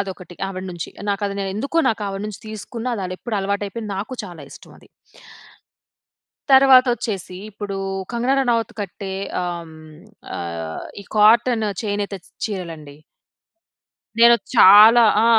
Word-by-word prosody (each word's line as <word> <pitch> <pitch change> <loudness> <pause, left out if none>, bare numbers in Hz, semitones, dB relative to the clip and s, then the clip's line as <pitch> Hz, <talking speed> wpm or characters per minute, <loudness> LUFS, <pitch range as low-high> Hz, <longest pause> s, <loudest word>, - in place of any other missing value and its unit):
అదొకటి, 185 -2 -7
ఆవిడ 185 -1 -6
నుంచి. 170 -2 -6 0.2
నాకు 200 +1 -2
అది 200 - -5
నేనే 195 -1 -3
ఎందుకో, 280 +8 -1
నాకు 220 -2 -1
ఆవిడ 195 +1 -5
నుంచి 210 -3 -8
తీసుకున్నా, 230 +3 -5
అది 185 - -6
ఎప్పుడు 225 -4 -4
అలవాటు 200 +1 -2
అయిపోయింది. 215 0 -6
నాకు 210 +6 -5
చాలా 175 -5 -10
ఇష్టం - - -14
అది. - - -21 1.7
తర్వాత 265 -1 +7
వచ్చేసి, 195 -6 -5
ఇప్పుడు 205 -1 -6 0.4
కంగనా 245 +3 +1
రనౌత్ 235 -4 0
కట్టే, 195 0 -6 0.3
ఆహ్, 170 -2 -6 0.6
ఆహ్ 85 -2 -6 0.2
ఈ - - -20
కాటన్ 225 +2 +4 0.2
చేనేత 205 -1 -3
చ్ - - -21 0.2
చీరలండి... 165 -8 -7 1.2
నేను 235 0 +8 0.2
చాలా 215 +5 +8 0.2
ఆ! - - +3
205 Hz, 135 wpm, -21 LUFS, 185-230 Hz, 1.7 s, నేను